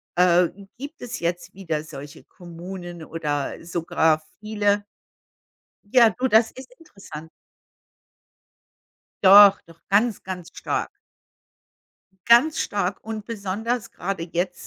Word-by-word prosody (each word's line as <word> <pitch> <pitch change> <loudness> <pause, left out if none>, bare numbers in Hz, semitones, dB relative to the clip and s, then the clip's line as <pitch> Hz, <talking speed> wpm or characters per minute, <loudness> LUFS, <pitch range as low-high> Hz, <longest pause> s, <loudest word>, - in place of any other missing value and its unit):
äh, 180 -1 +4 0.3
gibt 285 +5 -9
es 245 0 -6
jetzt 175 +1 -3
wieder 165 -5 -4
solche 145 +1 -11
Kommunen 175 -1 -10
oder 150 -2 -4
sogar 160 -2 +1 0.2
viele 205 -1 0 1.0
Ja, 230 +2 +5
du, 255 +7 -1
das 220 0 +4
ist 260 0 -12
interessant. 175 - -11 2.0
Doch, 200 +1 +9
doch 165 0 -18
ganz, 210 +2 +2
ganz 180 -2 -7
stark. - - -2 1.4
Ganz 240 +7 +5
stark 200 -2 -2
und 220 -1 -6
besonders 220 +1 -4
grade 180 -2 -5
jetzt 180 +1 -3
190 Hz, 105 wpm, -23 LUFS, 170-220 Hz, 2.0 s, Doch